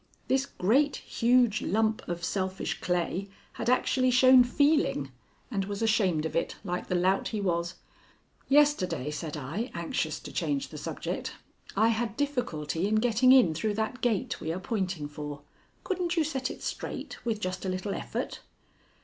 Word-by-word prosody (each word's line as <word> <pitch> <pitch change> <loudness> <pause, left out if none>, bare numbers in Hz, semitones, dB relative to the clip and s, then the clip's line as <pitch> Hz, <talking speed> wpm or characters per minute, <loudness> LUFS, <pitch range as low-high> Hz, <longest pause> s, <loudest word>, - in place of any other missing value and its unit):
This 265 +1 +1
great, 275 +8 +2
huge 240 -2 +2
lump 220 +1 +1
of 175 0 -4
selfish 190 0 -2
clay 180 +2 -1 0.2
had - - -2
actually 255 0 +3
shown 255 0 +7
feeling 265 - +2 0.4
and 195 -4 -1
was 205 +2 -3
ashamed 195 -8 +2
of 160 - -4
it, 165 - 0
like 180 -2 -3
the 180 - 0
lout 185 +2 +2
he 215 - -3
was. 170 -2 -1 0.7
"Yesterday," 275 - +3
said 150 +1 -5
I, 165 - -4
anxious - - -2
to - - -9
change 280 -1 -1
the - - -8
subject, - - -4 0.4
"I 220 +2 +5
had 225 -1 -1
difficulty 195 - -1
in 215 - +1
getting 240 +3 +4
in 250 -11 +6
through 205 +6 -1
that 220 +4 -2
gate 225 -6 0
we 160 - -2
are 175 - -3
pointing 185 -7 -2
for. 145 -1 -7 0.4
Couldn't 360 -2 -1
you 325 - +4
set 265 -4 -2
it - - -8
straight, - - -5
with 225 -3 -1
just 185 -2 -3
a 190 - -2
little 185 +2 -2
effort?" - - -4
210 Hz, 165 wpm, -29 LUFS, 180-250 Hz, 0.7 s, shown